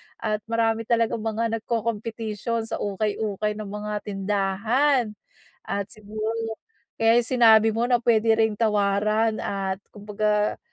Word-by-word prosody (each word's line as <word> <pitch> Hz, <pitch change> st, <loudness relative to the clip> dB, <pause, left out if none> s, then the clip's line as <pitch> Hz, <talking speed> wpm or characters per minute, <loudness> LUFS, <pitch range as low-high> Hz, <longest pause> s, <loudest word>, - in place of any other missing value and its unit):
At 215 Hz, -2 st, -2 dB
marami 225 Hz, -1 st, 0 dB
talagang 230 Hz, -1 st, +1 dB
mga 225 Hz, +1 st, -1 dB
nagkokompetisyon 225 Hz, 0 st, -3 dB
sa -, -, -2 dB
ukay-ukay 210 Hz, 0 st, -1 dB
ng 210 Hz, 0 st, -6 dB
mga 210 Hz, +1 st, -4 dB
tindahan. 210 Hz, +6 st, +1 dB, 0.5 s
At 200 Hz, -1 st, -3 dB
siguro 215 Hz, +2 st, -5 dB, 0.6 s
kaya 225 Hz, 0 st, +4 dB
'yong 240 Hz, 0 st, +2 dB
sinabi 225 Hz, -2 st, +7 dB
mo 230 Hz, +2 st, 0 dB
na 245 Hz, -1 st, +2 dB
puwede 225 Hz, -1 st, +4 dB
ring 220 Hz, -2 st, +1 dB
tawaran 215 Hz, +1 st, +2 dB
at 195 Hz, -1 st, -2 dB, 0.2 s
kumbaga 210 Hz, 0 st, 0 dB
215 Hz, 125 wpm, -24 LUFS, 210-225 Hz, 0.6 s, sinabi